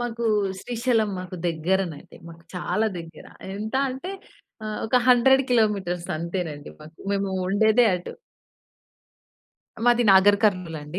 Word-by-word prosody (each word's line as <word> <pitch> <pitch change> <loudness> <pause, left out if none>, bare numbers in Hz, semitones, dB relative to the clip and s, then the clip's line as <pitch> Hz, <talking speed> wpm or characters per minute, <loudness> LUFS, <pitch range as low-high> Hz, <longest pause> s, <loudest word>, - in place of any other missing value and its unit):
మాకు 235 -1 -4 0.4
శ్రీశైలం 235 -2 0
మాకు 185 0 -7
దెగ్గరనండి. 170 -1 -2
మాకు 165 0 -13
చాలా 180 +5 -1
దెగ్గర. 165 0 -10 0.3
ఎంత 215 +4 -5 0.2
అంటే, 265 +9 -6 0.5
ఆహ్, 215 0 -4
ఒక 250 - +2
100 265 +2 +5
కిలోమీటర్స్ 200 -7 0
అంతేనండి 165 -3 -5
మాకు. 155 +2 -14 0.2
మేము 200 -1 -1 0.2
ఉండేదే 220 +4 +4
అటు. 180 0 -6 1.7
మాది 240 0 +4
నాగర్ 200 +2 +6
కర్నూల్ 180 -6 +1
అండి. 150 +5 -7
195 Hz, 120 wpm, -24 LUFS, 175-230 Hz, 1.7 s, నాగర్